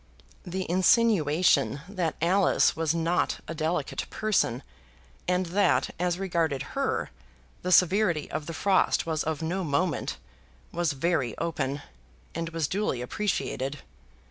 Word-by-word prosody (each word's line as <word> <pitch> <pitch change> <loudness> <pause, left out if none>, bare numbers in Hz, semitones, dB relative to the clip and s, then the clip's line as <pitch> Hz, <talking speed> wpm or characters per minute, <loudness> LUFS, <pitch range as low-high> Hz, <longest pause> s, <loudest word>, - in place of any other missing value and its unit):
The 185 +1 -4
insinuation 175 - +3
that 185 -5 -2
Alice 185 +3 +3
was 160 -2 0
not 165 +1 +1
a - - -4
delicate 155 -2 -2
person 195 - 0 0.6
and 180 +1 +1
that, 190 +4 +2
as 175 0 0
regarded 165 -7 -1
her, 275 0 -1 0.5
the 180 - -2
severity 180 -2 +4
of 155 -1 -4
the 165 - -4
frost 195 +2 +2
was 160 -2 -1
of 160 0 -3
no 180 +4 -1
moment, 160 +3 -1 0.5
was 170 -3 0
very 140 -5 0
open, 145 -4 -2 0.5
and 165 0 -3
was 165 -3 -1
duly 195 -9 -1
appreciated. 145 - -2
170 Hz, 125 wpm, -27 LUFS, 155-185 Hz, 0.6 s, severity